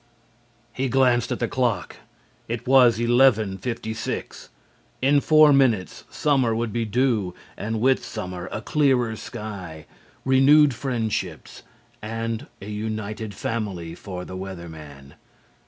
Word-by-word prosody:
He 130 0 -1
glanced 125 -2 +2
at - - -1
the 120 - -1
clock. 120 -7 -1 0.5
It 115 0 -4
was 125 -3 +6
11:56. 115 -2 0 0.5
In 140 +2 +3
four 155 -1 +6
minutes 120 -10 +1
summer 130 -6 +1
would 115 -1 -2
be 115 -1 -1
due, 110 -5 0 0.2
and 110 +1 -3
with 130 +3 +2
summer 90 0 -6
a 110 - -4
clearer 130 -6 +2
sky, 100 -9 -8 0.4
renewed 135 +2 +5
friendships 110 - -3 0.4
and 115 +1 -4
a 100 - -9
united 110 0 -4
family 95 -7 -4
for 90 0 -7
the 95 - -8
Weather 95 -2 -7
Man. 75 -4 -12
115 Hz, 120 wpm, -24 LUFS, 95-130 Hz, 0.5 s, was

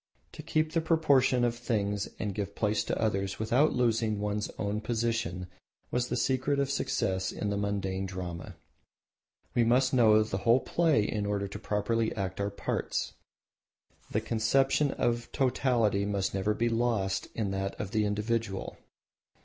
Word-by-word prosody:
To - - -9
keep 155 0 0
the 165 - +1
proportion 145 -6 +3
of 120 -1 +1
things 105 -4 -1
and 105 -2 -3
give 100 0 -4
place 105 0 +1
to - - -2
others 100 -3 0
without 120 +8 +2
losing 115 -3 +1
one's 105 0 -2
own 105 +1 -2
position 115 -4 -1 0.5
was 125 0 0
the - - -2
secret 130 +2 +1
of 140 -1 0
success 95 -8 -1
in 105 - -3
the - - 0
mundane 100 -2 -2
drama. 90 -2 -6 1.0
We 120 - +3
must 125 +3 +3
know 110 -4 +6
the 110 -3 -3
whole 115 +4 +4
play 160 -10 +2
in 105 -1 -2
order 100 -1 -1
to 100 +1 -7
properly 110 +2 0
act 95 -1 -3
our 100 - 0
parts; 100 - -2 1.0
the 110 - 0
conception 135 +6 +2
of 120 -2 -1
totality 125 -6 +2
must 100 -1 -1
never 100 +2 0
be 115 +2 +1
lost 115 -5 0
in 105 -4 -1
that 95 0 -3
of 100 - -4
the 110 0 +1
individual. 105 0 -2
110 Hz, 155 wpm, -29 LUFS, 100-120 Hz, 1.0 s, know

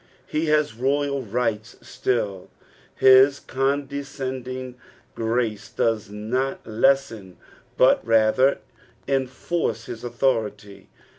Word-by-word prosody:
'^ - - -24
Ho 155 0 0
has 150 -2 +2
royal 140 +3 0
rights 115 -1 -2
still; 100 -7 -2 0.5
his 130 +2 +6
condescending 135 -2 -3 0.4
grace 115 -2 -2
does 110 -2 -1
not 120 +6 -3
lessen 110 -5 0 0.4
but - - +4
rather 115 +4 +3 0.5
enforce 130 -2 -2
hia - - -5
authority. 115 -5 -2
125 Hz, 90 wpm, -23 LUFS, 110-135 Hz, 0.5 s, his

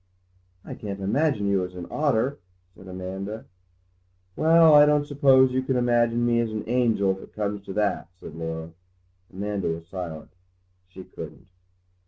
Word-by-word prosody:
"I - - -7
can't 100 -2 -6
imagine 110 +3 0
you 100 -2 +1
as 90 0 -7
an 90 -1 -6
otter," 140 -1 0 0.4
said 95 - -14
Amanda. 95 +4 -6 0.9
"Well, 160 0 +6
I 150 0 +8
don't 150 -1 +2
suppose 135 -2 +4
you 130 +1 0
can 130 0 -1
imagine 120 -1 +2
me 120 -1 +2
as 115 -1 0
an 110 -1 -4
angel, 115 -5 +2
if 95 - -4
it - - -14
comes 105 -1 -3
to 95 - -5
that," 105 0 -1
said - - -10
Laura. 80 0 -5 0.6
Amanda 100 +1 -3
was 80 0 -4
silent. 85 -3 -7 0.6
She 95 0 -11
couldn't. - - -10
105 Hz, 160 wpm, -25 LUFS, 95-130 Hz, 0.9 s, I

